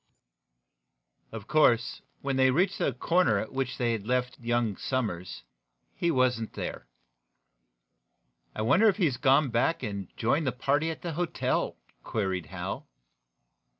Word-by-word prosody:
Of 110 -3 -8
course, 130 -6 +3 0.2
when 140 -1 -1
they 130 0 +4
reached 180 +8 +1
the - - +1
corner 150 - +2
at 110 +5 -4
which 130 -2 -2
they 120 -2 +1
had 110 -2 -3
left 125 0 -1
young 120 -3 0
Somers, 100 -10 -3 0.5
he 170 - 0
was 130 -5 +2
not 110 - -6
there. 60 - -6 1.7
"I 110 - -2
wonder 165 - +5
if 200 - 0
he 190 - +3
has 135 -6 0
gone 135 0 +3
back 125 +7 +1
and 100 -4 -4
joined 140 +6 +1
the 130 - 0
party 140 +5 +1
at 160 - -6
the 170 -2 -3
hotel?" 175 +1 -1 0.2
queried 95 - -2
Hal. - - -5
125 Hz, 150 wpm, -28 LUFS, 115-150 Hz, 1.7 s, wonder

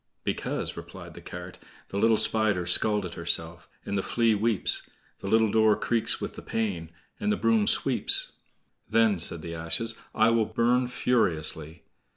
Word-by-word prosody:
"Because," - - -3
replied - - -10
the - - -11
cart: - - -9 0.3
"The 100 - -3
little 110 +1 +4
Spider's 105 -7 +2
scalt 105 -3 +1
herself, 85 0 -2 0.2
And 100 - -3
the 100 - +1
Flea 115 +2 +2
weeps; 110 -1 0 0.3
The - - -7
little 110 +1 +3
door 110 -1 +4
creaks 115 +1 0
with - - -5
the - - -8
pain, 95 -8 -3 0.3
And 210 0 0
the 210 - +1
broom 220 -2 +2
sweeps." - - +1 0.6
"Then," 110 -4 +3
said 85 -1 -2
the 85 - -6
ashes, 85 +8 -2 0.2
"I 110 +1 +4
will 115 -1 +2
burn 125 +3 +1
furiously." 80 -10 0
110 Hz, 160 wpm, -27 LUFS, 85-115 Hz, 0.6 s, little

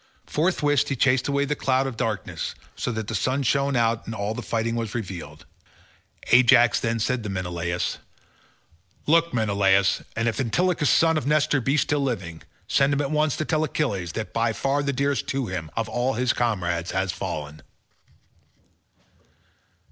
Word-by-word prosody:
Forthwith 150 -4 +1
he 135 - 0
chased 130 0 +2
away 140 0 +1
the 150 +1 -1
cloud 130 -1 +1
of 135 -3 -4
darkness, 110 -2 -3 0.2
so - - -2
that 110 -1 -3
the 115 - -4
sun 130 +7 0
shone 140 +2 +1
out 115 -1 +1
and 115 - -4
all 105 +1 -2
the - - -5
fighting 115 0 -1
was 115 -2 -3
revealed. 85 -8 -6 0.9
Ajax 120 -2 +6
then 115 0 -1
said 120 +3 0
to 105 - -5
Menelaus, 90 -2 -3 1.1
"Look, 165 +2 +3
Menelaus, 100 -4 +2
and 115 +1 0
if 115 - -1
Antilochus 150 +4 +1
son 160 +3 +4
of 145 - -6
Nestor 145 -2 +2
be 135 +5 +1
still 145 0 +1
living, 95 -12 -3 0.3
send 140 +1 +3
him 140 - +1
at 140 0 -2
once 155 -2 +1
to 155 - -2
tell 155 0 +1
Achilles 100 - -2
that 110 - -5
by 115 0 +1
far 140 +5 0
the 140 0 -1
dearest 140 +1 -1
to 135 -1 -1
him 90 -6 -5
of 115 - 0
all 125 +2 -1
his 125 +1 +1
comrades 90 -7 -1
has 95 0 -1
fallen." 75 -5 -5
120 Hz, 170 wpm, -24 LUFS, 100-140 Hz, 1.1 s, Ajax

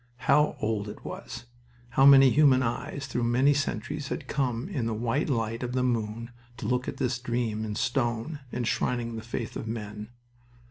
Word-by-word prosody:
How 150 0 +4
old 105 -1 -1
it - - -10
was! 120 +1 -7 0.4
How 135 +3 +5
many 135 -2 +8
human 135 -3 +5
eyes 130 +3 -3
through 120 -2 -2
many 130 +5 +4
centuries 145 0 -2
had - - -5
come 125 -1 -1
in 140 - -2
the 115 - -1
white 120 +7 0
light 115 -3 -1
of 125 -1 -3
the 130 0 +1
moon 115 -1 -2 0.3
to - - -6
look 125 +3 0
at - - -4
this 125 -1 -1
dream 120 -3 -2
in 105 -1 -4
stone 120 +4 -1
enshrining 120 0 -1
the 110 - -5
faith 115 0 -5
of 110 - -5
men! 105 -1 -5
120 Hz, 180 wpm, -28 LUFS, 115-135 Hz, 0.4 s, many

